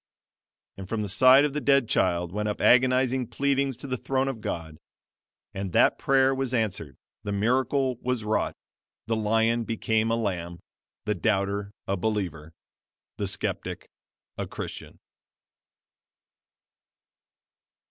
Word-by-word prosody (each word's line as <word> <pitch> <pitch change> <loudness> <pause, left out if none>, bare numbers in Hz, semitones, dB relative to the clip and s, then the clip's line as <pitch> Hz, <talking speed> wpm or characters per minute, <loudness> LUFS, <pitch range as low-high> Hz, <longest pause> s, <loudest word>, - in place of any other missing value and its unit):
And 95 -1 -8
from 110 -2 -1
the - - -3
side 130 +7 +6
of 145 - -2
the 150 - -2
dead 140 -1 +3
child 85 -4 +1
went 105 +2 -2
up 105 - -4
agonizing 130 0 +3
pleadings 140 -1 0
to - - -10
the 130 -3 -3
throne 135 0 0
of 125 -5 -4
God. 80 -5 -5 0.7
And 95 -2 -5
that - - +4
prayer 135 0 +3
was 130 -1 -2
answered 95 - -2 0.2
the 100 - -4
miracle 130 +5 +1
was 125 -3 -2
wrought 110 +1 -1 0.5
the 115 - 0
lion 110 +2 +1
became 110 0 0
a 115 - +2
lamb 90 -6 -3 0.5
the 105 - +1
doubter 100 -1 -1 0.2
a 95 - 0
believer 90 -6 -3 0.7
the - - -2
skeptic - - -3 0.5
a - - -3
Christian! - - -8
110 Hz, 130 wpm, -26 LUFS, 100-130 Hz, 0.7 s, side